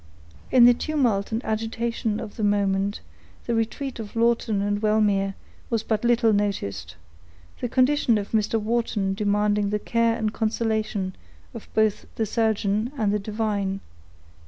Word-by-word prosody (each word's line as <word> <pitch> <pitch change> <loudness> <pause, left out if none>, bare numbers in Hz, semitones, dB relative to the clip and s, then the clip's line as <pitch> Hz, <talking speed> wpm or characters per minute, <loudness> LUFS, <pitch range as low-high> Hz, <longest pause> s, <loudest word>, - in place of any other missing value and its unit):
In 250 -2 +7
the 245 - +8
tumult 240 -8 0
and 225 +3 -2
agitation 225 0 -2
of 205 - -7
the 220 - -4
moment, 200 -1 +1 0.4
the 235 - -1
retreat 230 +4 -2
of 215 -1 -7
Lawton 230 -2 +2
and 205 +1 -1
Wellmere 205 -2 +2 0.3
was 230 -2 0
but 220 0 -1
little 235 -2 +3
noticed; 100 - -2 0.6
the 245 - -2
condition 255 -2 +3
of 200 -1 -4
Mr. 220 0 +1
Wharton 215 -3 0
demanding 205 0 +1
the 210 - 0
care 230 +1 +1
and 220 -2 -1
consolation 220 -4 -1 0.4
of 230 - -9
both 220 -1 +1
the 225 - 0
surgeon 215 +1 0
and 210 -4 +1
the 210 - +1
divine. 205 -2 -2
215 Hz, 145 wpm, -24 LUFS, 205-230 Hz, 0.6 s, the